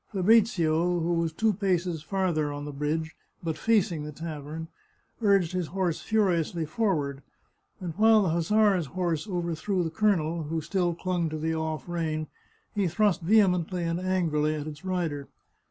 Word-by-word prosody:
Fabrizio, 180 -5 +3
who 170 +1 0
was 165 -1 0
two 220 +6 +1
paces 180 -4 0
farther 160 -3 0
on 145 0 -5
the 145 - -5
bridge, 155 +3 -2 0.3
but 160 -2 -2
facing 180 -5 +1
the 150 - -6
tavern, 155 +1 -6 0.5
urged 195 -6 +3
his 180 -3 -2
horse 180 -3 -1
furiously 175 -6 +1
forward, 150 -7 -1 0.6
and 175 -3 -5
while 220 0 +6
the 185 - +1
hussar's 185 +1 +2
horse 170 +2 -2
overthrew 175 0 -1
the 160 - -3
colonel, 170 -6 +1
who 160 +2 -2
still 175 +1 0
clung 175 -2 -1
to 155 - -4
the 160 +1 -1
off 160 0 -3
rein, 160 -3 -2 0.5
he 200 -3 +1
thrust 190 +1 +2
vehemently 180 -2 +3
and 165 +1 -1
angrily 165 -5 +1
at 150 -1 -4
its 150 +1 -8
rider. 170 -7 -2
170 Hz, 155 wpm, -27 LUFS, 155-190 Hz, 0.6 s, while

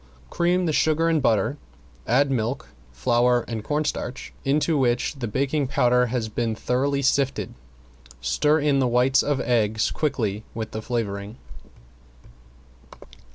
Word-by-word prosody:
Cream 175 +1 +1
the 160 - 0
sugar 160 +2 +2
and 160 -2 +2
butter, 115 +5 +1 0.5
add 135 +4 +3
milk, 120 +1 -2 0.2
flour 120 - +2
and 110 -2 -4
cornstarch 145 -2 -3
into 150 +4 +1
which 125 -3 +1
the 120 - -3
baking 140 +5 0
powder 125 -1 +3
has 120 -2 -2
been 110 +1 -2
thoroughly 140 +5 0
sifted, 135 0 0 0.7
stir 150 - +2
in 145 -2 +2
the 130 - +2
whites 125 +2 +3
of 145 -2 0
eggs 110 -3 +1
quickly 110 -9 -2
with 110 -1 -4
the 110 - -5
flavoring. 105 -3 -4
125 Hz, 130 wpm, -24 LUFS, 115-145 Hz, 0.7 s, add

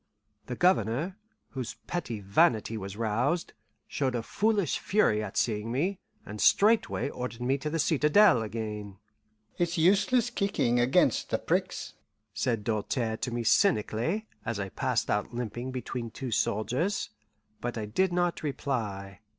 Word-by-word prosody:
The 125 - -4
Governor, 175 - +1 0.3
whose 130 -4 -5
petty 120 -12 -4
vanity 110 - +2
was 100 -1 -6
roused, 120 +10 0 0.3
showed 130 -3 -1
a 115 - -2
foolish 205 - +1
fury 185 - +2
at 100 - -6
seeing 110 0 0
me, 180 +10 -1 0.3
and 105 0 -6
straightway 220 +3 +4
ordered 125 -2 -6
me 135 +3 +1
to 150 - -3
the 165 - -1
citadel 155 - +4
again. 105 -2 -5 0.6
"It's 175 -1 0
useless 205 +8 +3
kicking 195 - +1
'gainst - - +3
the - - +1
pricks," - - -2 0.4
said 115 -1 -1
Doltaire 110 +1 -1
to - - -3
me 120 0 -2
cynically, 165 - +2 0.2
as 115 -2 -3
I 95 -1 -3
passed - - -1
out 105 +3 -1
limping 120 +2 -4
between 125 -2 -4
two 130 +2 -6
soldiers; 125 - 0 0.5
but 120 0 -4
I 110 - -3
did 180 - +1
not 175 -1 0
reply. 105 -10 -3
125 Hz, 140 wpm, -29 LUFS, 110-175 Hz, 0.6 s, straightway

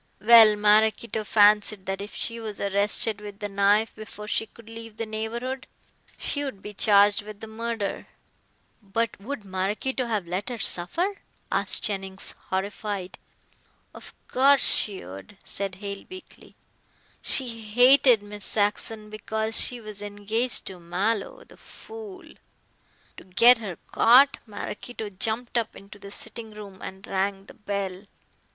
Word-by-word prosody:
Well, 220 0 +8
Maraquito 215 +2 +2
fancied 210 -1 +4
that 195 0 -3
if 205 - -8
she 230 0 -3
was 215 -2 -6
arrested 200 +2 +1
with 205 -1 -9
the 205 -1 -4
knife 200 +2 +2
before 210 -1 -10
she 220 - -1
could 230 +1 -18
leave 225 -1 -10
the 225 - -3
neighborhood 235 +4 -5 0.5
she 285 - -1
would 260 -9 -6
be 210 - -7
charged 205 +1 +4
with 210 0 -11
the 220 - -8
murder." 225 -1 -4 0.7
"But 220 +2 -2
would 220 0 -7
Maraquito 205 +7 -2
have 215 -5 -2
let 185 +6 -3
her 245 - -5
suffer?" 335 - -2 0.3
asked - - +2
Jennings, 195 -2 -3 0.2
horrified. 195 0 -4 0.7
"Of - - -12
course 275 +2 +4
she 200 - +4
would," 95 - -11
said 195 -2 -4
Hale 200 +1 -7
weakly, 370 0 -12 0.7
"she 265 - +5
hated 245 +1 +5
Miss 205 0 -9
Saxon 210 +1 -1
because 220 +1 -3
she 245 - +2
was 215 -2 -10
engaged 205 +4 -1
to 190 -2 -8
Mallow, 200 - -2
the - - -19
fool. 435 -4 -11 0.9
To - - -11
get 230 +6 +5
her 195 -7 -6
caught, 265 +4 +6
Maraquito 215 +1 -6
jumped 225 +5 -1
up 225 - -5
into 200 +1 -13
the 200 - -10
sitting 220 +2 -5
room 200 -3 -11
and 190 +1 -8
rang 195 0 -2
the - - -14
bell." 200 -2 -5
210 Hz, 145 wpm, -25 LUFS, 200-230 Hz, 0.9 s, Well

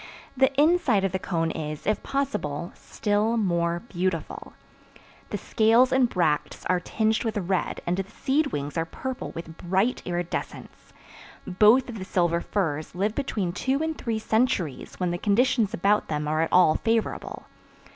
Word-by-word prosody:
The 265 +1 +4
inside 300 - +3
of 195 - +1
the 190 - -2
cone 165 -3 -1
is, 155 -2 -5
if 215 +1 0
possible, 210 - -2
still 210 +2 -1
more 170 -4 0
beautiful. 185 -6 -4 0.8
The - - -2
scales 230 +3 +3
and 260 -2 +3
bracts 160 -7 -1
are 180 0 +2
tinged 220 +4 0
with 225 -2 -2
red 190 -1 -1
and 175 +1 0
the 195 0 -3
seed 280 +6 0
wings 145 - -3
are 165 - 0
purple 260 +9 -5
with 165 -1 -7
bright 190 +7 0
iridescence. 175 -1 -5 0.5
Both 215 +7 +4
of 230 -4 -7
the 190 - -6
silver 175 -3 +1
firs 160 -5 -2
live 205 +4 0
between 215 -10 -2
two 270 - 0
and 320 0 -2
three 230 -6 -2
centuries 220 - -1
when 180 -1 0
the 175 - -3
conditions 225 +1 +2
about 205 +4 +1
them 150 -1 -2
are 155 +1 +1
at 165 - 0
all 180 -4 +6
favorable. 225 -1 -2
195 Hz, 160 wpm, -26 LUFS, 170-230 Hz, 0.8 s, all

